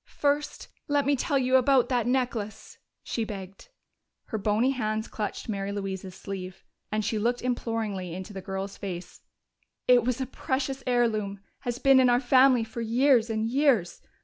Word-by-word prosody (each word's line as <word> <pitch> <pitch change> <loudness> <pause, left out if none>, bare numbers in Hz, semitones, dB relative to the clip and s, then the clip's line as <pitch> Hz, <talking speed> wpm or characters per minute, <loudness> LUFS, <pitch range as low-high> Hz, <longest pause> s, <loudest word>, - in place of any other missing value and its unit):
"First 290 +1 -1 0.2
let 290 -2 +2
me 285 +1 +3
tell 280 +2 0
you 260 0 +4
about 260 -1 +4
that 245 -3 +1
necklace!" 245 -5 -2 0.2
she 230 - -2
begged. 195 - -8 0.6
Her 220 - -2
bony 215 +6 +2
hands 220 -3 -2
clutched 210 -2 -5
Mary 200 -2 -3
Louise's 190 -2 -5
sleeve, 190 -1 -7 0.3
and 215 0 -1
she 220 0 0
looked 240 +3 0
imploringly 220 -7 -2
into 190 +3 -7
the 190 - -6
girl's 195 +1 -5
face. 185 -3 -7 0.7
"It 245 -2 +6
was 250 +1 -1
a 260 - -1
precious 265 +1 -3
heirloom 215 -5 +1 0.2
has 245 -3 -3
been 270 0 +5
in 255 -1 +5
our 245 0 +4
family 255 -1 +5
for 225 +1 -6
years 235 +1 +3
and 220 0 -1
years. 245 - +2
230 Hz, 165 wpm, -27 LUFS, 200-255 Hz, 0.7 s, It